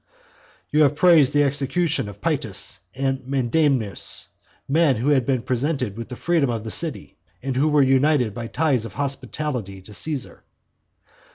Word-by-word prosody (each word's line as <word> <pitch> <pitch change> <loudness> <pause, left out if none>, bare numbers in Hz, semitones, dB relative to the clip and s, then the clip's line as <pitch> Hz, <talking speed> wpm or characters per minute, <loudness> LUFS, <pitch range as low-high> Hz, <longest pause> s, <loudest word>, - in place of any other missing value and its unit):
"You 150 - +3
have 145 -1 +4
praised 160 -4 +5
the 145 0 +3
execution 145 -1 0
of 100 0 -13
Paetus - - 0 0.2
and 135 0 -1
Menedemus, 135 -4 0 0.4
men 150 -1 +3
who 120 +6 -1
had 135 -4 +2
been 130 -4 0
presented 130 -3 -1
with 115 0 -7
the 125 - -6
freedom 165 -2 +1
of 115 -2 -3
the 110 - -6
city, 150 - -1 0.3
and 135 -1 -3
who 140 +4 +2
were 150 -2 +4
united 135 -3 +2
by 115 +2 -6
ties 135 -3 0
of 110 - -8
hospitality 130 -5 -3
to 105 - -12
Caesar." 145 +2 -4
135 Hz, 160 wpm, -22 LUFS, 120-150 Hz, 0.4 s, praised